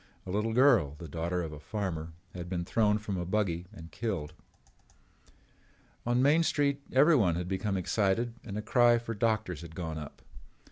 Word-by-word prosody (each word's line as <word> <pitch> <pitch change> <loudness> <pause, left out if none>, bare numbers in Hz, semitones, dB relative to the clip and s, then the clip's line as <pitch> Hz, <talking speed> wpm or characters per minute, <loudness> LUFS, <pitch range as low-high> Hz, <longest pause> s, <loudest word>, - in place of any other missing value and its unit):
A 95 - -5
little 105 +3 0
girl, 120 - +4
the 85 - -8
daughter 85 +3 -2
of 80 - -5
a 75 - -8
farmer, 85 -3 -4 0.2
had 90 -1 -6
been 85 -2 -2
thrown 105 +1 +2
from 105 -3 -4
a 90 - -2
buggy 90 -2 -1
and 85 -6 -11
killed. 95 -9 -3 1.7
On 120 +1 +3
Main 150 +4 +5
Street 145 -3 +1
everyone 130 - +5
had 90 +1 -3
become 95 +1 -1
excited 105 +5 0
and 105 -3 -6
a 105 - -3
cry 120 +1 +5
for 115 -1 -4
doctors 110 -6 0
had 80 -1 -10
gone 80 -3 -4
up. 75 -1 -10
100 Hz, 175 wpm, -30 LUFS, 85-115 Hz, 1.7 s, Main